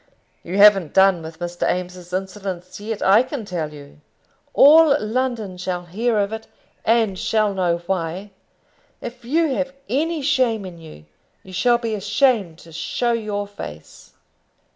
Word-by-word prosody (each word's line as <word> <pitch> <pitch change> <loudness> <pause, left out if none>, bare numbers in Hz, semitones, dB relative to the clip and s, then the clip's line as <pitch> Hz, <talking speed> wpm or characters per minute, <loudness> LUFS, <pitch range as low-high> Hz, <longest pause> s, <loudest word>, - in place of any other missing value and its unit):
"You 180 +3 -5
haven't 200 -6 +6
done 190 -2 +5
with 160 0 -9
Mr. 175 +1 -2
Eames's 180 0 -5
insolence 185 -1 -5
yet, 210 0 -4
I 200 +4 +6
can 255 -2 -5
tell 165 -6 -4
you. 145 0 -14 0.5
All 305 0 +7
London 220 -3 -2
shall 180 -1 -3
hear 220 +6 -1
of 205 +1 0
it, 220 0 -6 0.4
and 220 -4 +2
shall 215 -2 +1
know 180 -3 +1
why. 185 +2 -3 0.7
If 240 +1 -8
you 305 +4 +1
have 270 +1 -2
any 310 +3 -1
shame 255 -7 +1
in 175 -2 -9
you, 155 - -13 0.4
you 190 - -13
shall 240 +6 +3
be 230 -2 -3
ashamed 205 - +1
to 165 - -15
show 235 +9 -1
your 210 -3 -2
face." 135 - -11
205 Hz, 150 wpm, -21 LUFS, 180-235 Hz, 0.7 s, All